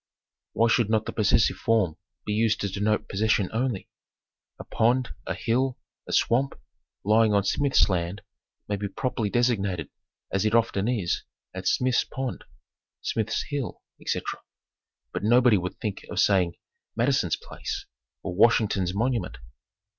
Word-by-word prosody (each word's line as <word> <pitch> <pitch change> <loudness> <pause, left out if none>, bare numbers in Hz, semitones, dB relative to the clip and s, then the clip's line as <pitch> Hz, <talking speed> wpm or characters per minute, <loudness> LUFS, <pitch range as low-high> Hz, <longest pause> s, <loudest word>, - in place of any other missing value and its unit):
Why 115 - +3
should 115 -1 +2
not 110 -1 +2
the - - -3
possessive 110 +1 +3
form 105 -8 +1 0.3
be 105 - -1
used 110 0 +2
to 100 - 0
denote 105 +2 0
possession 105 -1 +1
only? 115 -3 -1 0.7
A - - -8
pond, 120 +2 +1 0.2
a - - -1
hill, 130 +2 0 0.3
a - - -6
swamp, 130 +4 +2 0.4
lying 110 +1 +4
on 100 - +3
Smith's 140 +7 +3
land 90 0 -2 0.4
may 105 - -1
be 100 0 -3
properly 115 0 -2
designated 100 - 0 0.4
as 95 - +1
it 110 +1 +2
often 110 -3 +2
is, 105 -8 0 0.3
as - - -1
Smith's 125 -1 +2
pond, 130 -2 -5 0.6
Smith's 110 -1 -1
hill, 140 -5 -4 0.2
ete. - - -1 1.0
But - - -2
nobody 120 -1 +5
would 90 +1 -5
think 105 -2 -4
of - - -3
saying 90 -4 +3 0.4
Mad 120 +4 +2
ison's 95 - +2
Place, - - -6 0.4
or - - -3
Washington's 100 -3 +3
Monument. 115 -3 -1
110 Hz, 145 wpm, -26 LUFS, 100-120 Hz, 1.0 s, nobody